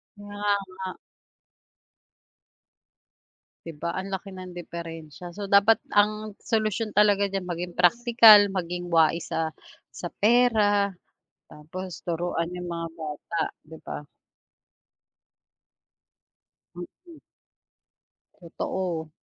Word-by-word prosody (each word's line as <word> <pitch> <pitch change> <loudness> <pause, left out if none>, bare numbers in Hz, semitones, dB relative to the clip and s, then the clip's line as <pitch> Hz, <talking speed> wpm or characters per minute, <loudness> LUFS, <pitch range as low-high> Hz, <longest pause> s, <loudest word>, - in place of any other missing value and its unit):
Kaya 205 0 -2
nga. 185 0 -6 2.7
'Di 165 - -7
ba, 170 +3 -3
ang 190 +1 -4
laki 195 0 -5
ng 185 -1 -9
diperensiya, 170 -1 -8
so, 205 - -4
dapat 200 +3 +5 0.2
ang 210 0 +2
solusyon 215 -1 -1
talaga 205 -1 +4
diyan 195 -1 -3
maging 175 0 -5
praktikal 215 +1 +7
maging 175 -2 -4
wais 165 0 +2
sa 160 -1 -2 0.4
sa 175 - -6
pera, 210 -3 +3 0.6
tapos 180 +4 -9
turuan 170 0 -2
yung 180 0 -6
mga 170 -1 -4
bata 155 +2 -4 0.2
'di 160 +1 -12
ba? - - -7 2.7
Mhm. 315 - -12 1.2
Totoo. 170 -2 -4
185 Hz, 95 wpm, -26 LUFS, 170-205 Hz, 2.7 s, praktikal